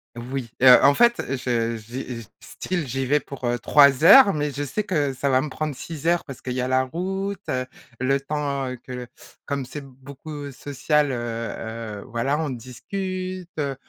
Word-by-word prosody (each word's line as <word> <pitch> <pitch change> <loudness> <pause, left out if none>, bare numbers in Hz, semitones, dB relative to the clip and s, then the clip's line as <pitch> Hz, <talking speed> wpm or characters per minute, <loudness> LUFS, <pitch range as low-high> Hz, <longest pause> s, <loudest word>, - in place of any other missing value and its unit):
Oui, 125 0 -5
heu, 125 -1 +10
en 140 +1 +6
fait, 235 +4 +4 0.2
je 115 -2 -1
j'y 120 +2 -6
je - - -18
style 175 -5 -4
j'y 135 +2 -2
vais 145 +3 +3
pour, 140 -3 -8
heu, 120 0 0
3 140 +1 +5
heures, 200 +3 +9
mais 150 -1 -1
je 140 +2 -4
sais 145 +10 -2
que 150 -9 0
ça 140 +2 -1
va 130 0 +4
me 150 - -4
prendre 155 0 -3
6 160 +3 -6
heures 175 0 +2
parce 135 -3 -9
qu'il 125 - -4
y 130 - -1
a 125 - -1
la 130 0 +3
route, 190 +7 -3
heu, 130 0 -1 0.3
le 135 +2 +2
temps 140 -2 -2
que - - -11
le 125 -1 -6 0.4
comme 140 -1 -2
c'est 145 +2 -8
beaucoup 140 +2 -9
social, 145 +2 0
heu, - - -2 0.9
heu, - - -10
voilà, 130 +6 -1
on 160 -2 -1
discute, 185 - -5
heu, 140 -2 -1
140 Hz, 195 wpm, -24 LUFS, 130-155 Hz, 0.9 s, heu